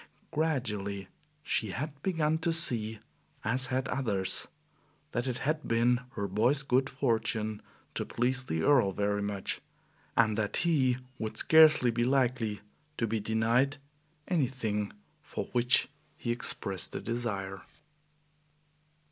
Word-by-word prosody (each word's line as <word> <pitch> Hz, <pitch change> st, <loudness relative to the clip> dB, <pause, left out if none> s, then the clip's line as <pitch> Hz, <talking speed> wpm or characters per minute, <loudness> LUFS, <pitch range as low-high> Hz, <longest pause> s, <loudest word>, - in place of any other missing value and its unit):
Gradually 105 Hz, -, -2 dB, 0.3 s
she 110 Hz, -6 st, 0 dB
had 140 Hz, +7 st, -5 dB
begun 160 Hz, -3 st, +1 dB
to 165 Hz, +1 st, 0 dB
see, 115 Hz, -9 st, +2 dB, 0.5 s
as 130 Hz, +4 st, 0 dB
had 130 Hz, +1 st, -1 dB
others, 105 Hz, -9 st, +1 dB, 0.6 s
that 120 Hz, +3 st, -1 dB
it 125 Hz, -1 st, -1 dB
had 155 Hz, +1 st, -1 dB
been 120 Hz, +1 st, +3 dB
her 100 Hz, -2 st, -2 dB
boy's 120 Hz, +9 st, +2 dB
good 130 Hz, +1 st, +2 dB
fortune 110 Hz, -5 st, -1 dB, 0.3 s
to -, -, -2 dB
please 130 Hz, +2 st, 0 dB
the 80 Hz, -7 st, -2 dB
Earl 125 Hz, -10 st, +4 dB
very 105 Hz, +1 st, 0 dB
much, 100 Hz, -1 st, -2 dB, 0.6 s
and 110 Hz, -2 st, +4 dB
that 105 Hz, -2 st, 0 dB
he 130 Hz, -7 st, +3 dB, 0.2 s
would 110 Hz, -1 st, -4 dB
scarcely 155 Hz, -6 st, +6 dB
be 120 Hz, +1 st, 0 dB
likely 125 Hz, -5 st, +1 dB, 0.4 s
to 115 Hz, -, +1 dB
be 110 Hz, 0 st, -1 dB
denied 115 Hz, +6 st, +1 dB, 0.5 s
anything 120 Hz, -, -1 dB, 0.3 s
for -, -, -5 dB
which 120 Hz, 0 st, +3 dB, 0.3 s
he 120 Hz, -, -2 dB
expressed 100 Hz, -6 st, +1 dB
a -, -, -1 dB
desire. 100 Hz, -6 st, -3 dB
120 Hz, 125 wpm, -30 LUFS, 105-135 Hz, 0.6 s, scarcely